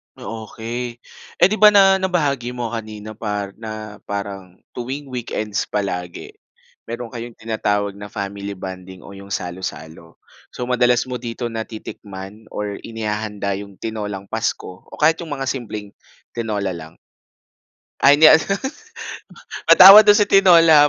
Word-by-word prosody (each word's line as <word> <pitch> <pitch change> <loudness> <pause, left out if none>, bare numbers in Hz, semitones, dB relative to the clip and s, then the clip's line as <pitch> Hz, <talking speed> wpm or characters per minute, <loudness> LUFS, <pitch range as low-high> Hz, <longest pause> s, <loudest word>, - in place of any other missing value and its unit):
O 110 -1 -7
okey. 120 +3 -5 0.5
Eh, - - +9
'di 215 - -1
ba, 210 - +9
na 195 -1 +6
nabahagi 140 -10 -1
mo 120 -2 -4
nga 115 - -2
kanina 110 0 -9
par 105 -2 -4
na 110 -2 -7
parang 100 -2 -6 0.2
tuwing 130 +3 -6
weekends 110 -4 -3
palagi, 90 -4 -4 0.6
mayro'n 120 0 -6
kayong 120 -1 -7
tinatawag 105 -2 -1
na 105 - -7
family 100 -1 -5
bonding 95 0 -9
o 95 - -12
'yong 100 0 -11
salo-salo. 90 -3 -6 0.4
So, - - -4
madalas 125 -1 +2
mo 125 -1 -5
dito 120 0 -5
natitikman 105 -2 -8
or 105 -1 -5
inihahanda 105 -3 -4
'yong 100 -1 -10
tinolang 105 -2 -5
Pasko 110 -4 -4
o - - -11
kahit 160 +2 +3
'yong 160 -4 -5
mga 135 -1 -2
simpleng 105 -5 -6 0.4
tinola 105 -4 -2
lang. 80 -2 -9 1.1
Ay, 145 +1 +7
hindi 155 - +9
ano, 160 - +7 1.3
patawad 195 +3 +11
do'n 205 0 +6
sa 210 - +3
tinola, 165 -7 +7
110 Hz, 140 wpm, -20 LUFS, 100-125 Hz, 1.3 s, patawad